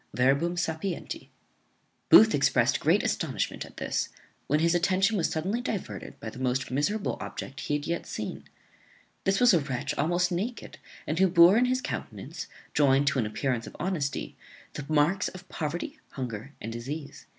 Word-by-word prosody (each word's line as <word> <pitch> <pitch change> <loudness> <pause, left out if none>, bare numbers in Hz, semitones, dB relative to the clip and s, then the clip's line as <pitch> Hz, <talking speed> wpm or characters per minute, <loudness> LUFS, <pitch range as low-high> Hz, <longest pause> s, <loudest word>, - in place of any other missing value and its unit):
Verbum 140 +7 +2
sapienti.] 175 +1 -3 0.8
Booth - - +9
exprest - - +3
great - - +3
astonishment - - -1
at - - -18
this, - - -1 0.4
when 150 +2 +2
his 165 +1 +3
attention 190 +4 +2
was 175 -5 +1
suddenly 190 +9 -1
diverted 220 -6 -5
by - - -7
the 130 - -10
most 130 0 -1
miserable 195 +11 0
object 135 - -6
that - - -5
he 145 - 0
had 145 0 -3
yet 170 +1 -2
seen. - - -5 0.8
This 195 0 +2
was 245 -3 +6
a 170 - +5
wretch 135 -4 -3
almost 175 +4 +2
naked, 215 +7 -4 0.3
and 155 +3 -2
who 190 - +6
bore 170 +1 +7
in 240 +2 +4
his 255 +1 +1
countenance, - - -5 0.3
joined 140 -1 +4
to 135 - -1
an 110 - +1
appearance 115 +2 -2
of - - -10
honesty, 165 -7 -2 0.4
the 145 -1 -6
marks 155 +5 +3
of 185 0 -9
poverty, 175 - -4
hunger, 125 0 -5
and 115 +1 -5
disease. 140 +6 -6
160 Hz, 170 wpm, -28 LUFS, 140-185 Hz, 0.8 s, Booth